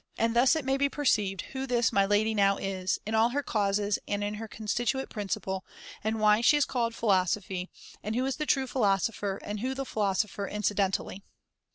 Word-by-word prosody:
And 230 0 +1
thus 250 +6 +5
it 315 -4 -2
may 270 0 +1
be 280 0 +2
perceived 210 -10 +1
who 270 0 -4
this 240 -2 +2
my 200 - +4
[[1503 205 +1 +4
lady 220 +1 0
now 200 -2 +3
is, 190 -1 -2
in 215 - -3
all 220 +1 +4
her 285 +3 -1
causes 205 -2 0
and 205 0 -1
in 205 0 -2
her 220 +1 -6
con 215 0 -10
stituent 240 +5 -1
principle, 190 -2 -3 0.4
and 220 +1 -1
why 210 +1 +4
she 295 +5 +5
is 290 - +3
called 230 -2 -1
philo 195 -6 +3
sophy, 185 -1 -3 0.3
and 215 +2 -3
who 255 +2 +1
is 270 - -2
the 305 -1 -3
true 270 -2 +2
philosopher 205 -4 0
and 210 0 -4
who 260 +4 -2
the 270 0 -3
philosopher 200 -2 -1
incidentally. 200 -1 -1
215 Hz, 210 wpm, -29 LUFS, 200-245 Hz, 0.4 s, thus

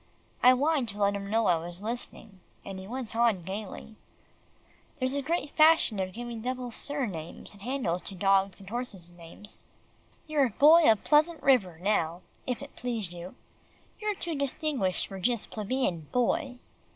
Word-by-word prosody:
I 250 +1 +8
whined 280 -2 +1
to 200 - -7
let 200 0 +3
him 200 0 -5
know 225 +1 +2
I 175 -3 +4
was 170 +2 -6
listening, 220 -2 -5 0.3
and 195 -1 -6
he 190 - -9
went 245 -1 -5
on 230 -6 +2
gaily, 205 +3 -7 1.0
"There's 260 -1 0
a 280 - 0
great 310 0 -2
fashion 310 -9 +5
of 185 -1 -2
giving 235 0 -6
double 250 0 -3
sir 285 +3 -2
names 165 -4 -7
and 200 - -16
handles 230 -7 -1
to 195 - -5
dogs 195 +1 +2
and 195 - -13
horses' 200 -6 -4
names. 175 +4 -9 0.6
You're 295 -5 +2
Boy 305 +7 +7
of 220 - 0
Pleasant 310 +1 +3
River 205 -11 +3
now, 175 -2 0 0.3
if 250 +2 -2
it 280 - -12
please 230 -7 -2
you. 175 +1 -9 0.6
You're 425 -1 -1
too 345 -3 -3
distinguished 275 - 0
for 195 - -8
just 235 +3 0
plebeian 210 - -2
Boy." 255 +2 0
225 Hz, 165 wpm, -29 LUFS, 190-265 Hz, 1.0 s, I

